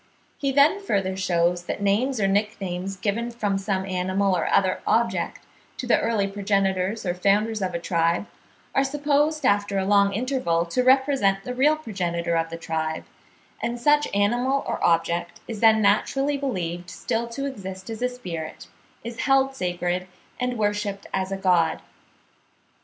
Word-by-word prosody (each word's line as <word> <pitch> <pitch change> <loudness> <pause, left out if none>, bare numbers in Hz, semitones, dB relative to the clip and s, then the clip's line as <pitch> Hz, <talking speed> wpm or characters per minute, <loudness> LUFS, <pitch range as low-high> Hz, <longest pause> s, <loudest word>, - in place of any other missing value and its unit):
He 275 -1 0
then 290 +9 +4
further 195 - -1
shews 175 -2 +1
that - - -3
names 220 +6 +1
or 195 - +2
nicknames 195 -2 -1
given 220 +5 -2
from 210 -5 -1
some 195 -1 -1
animal 185 +1 0
or 170 - -1
other 190 -1 +2
object, 230 +1 0 0.4
to - - -4
the 245 - +3
early 220 -3 +1
progenitors 195 0 0
or 175 - 0
founders 205 +4 +1
of 185 -2 -2
a - - -1
tribe, 170 +2 +1 0.5
are 270 - +3
supposed 295 +2 +1
after 205 -1 +2
a 190 - 0
long 200 0 +4
interval 220 -8 0
to 170 +9 0
represent 260 -7 +3
the 250 - -4
real 285 +5 +4
progenitor 175 - -2
of 165 0 0
the 165 - -6
tribe; 160 -1 -3 0.6
and 240 +1 -2
such 295 +3 +3
animal 245 +7 +1
or - - -3
object 170 +1 +1
is 225 -3 -5
then 220 -1 +5
naturally 270 +8 +2
believed 180 -11 -3
still 230 +6 -2
to 275 +4 -4
exist 190 -8 -6
as 225 - -6
a 250 - +1
spirit, 170 -11 -7 0.4
is 235 +2 -7
held 270 0 +2
sacred, 180 -3 -2 0.3
and 250 -1 -1
worshipped 205 -1 -1
as 190 0 -1
a 195 - -2
god. 175 -4 +2
200 Hz, 160 wpm, -24 LUFS, 185-245 Hz, 0.6 s, then